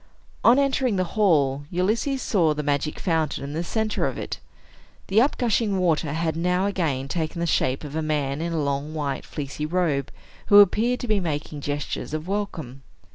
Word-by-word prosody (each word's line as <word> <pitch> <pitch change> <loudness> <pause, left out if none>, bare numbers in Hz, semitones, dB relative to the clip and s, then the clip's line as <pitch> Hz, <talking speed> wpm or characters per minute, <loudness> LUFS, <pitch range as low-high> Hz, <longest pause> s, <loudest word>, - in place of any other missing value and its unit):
On 240 +3 +7
entering 270 -5 +2
the 185 - +1
hall, 145 -9 +2
Ulysses 220 +9 0
saw 165 -7 +2
the 150 - -3
magic 145 +1 -1
fountain 160 -6 -1
in 140 +1 -5
the 165 +3 -2
center 220 +4 -1
of - - -4
it. - - -5 0.7
The 205 +4 +5
up 275 - +1
gushing 225 -4 +1
water 165 -4 +1
had 160 -1 -1
now 180 +3 +1
again 160 -10 -1
taken 160 +2 -3
the 170 - 0
shape 130 -5 +1
of 145 0 -7
a 160 - 0
man 150 -2 -1
in 170 +1 -2
a 160 -3 0
long, 140 +2 -2
white, 145 -3 -3
fleecy 150 0 -4
robe, 155 -6 0 0.4
who 205 - +7
appeared 225 +5 +4
to 245 - -4
be 215 -2 +2
making 150 -3 -4
gestures 145 +1 -3
of 155 +2 -5
welcome. 165 -10 -4
165 Hz, 185 wpm, -24 LUFS, 145-200 Hz, 0.7 s, On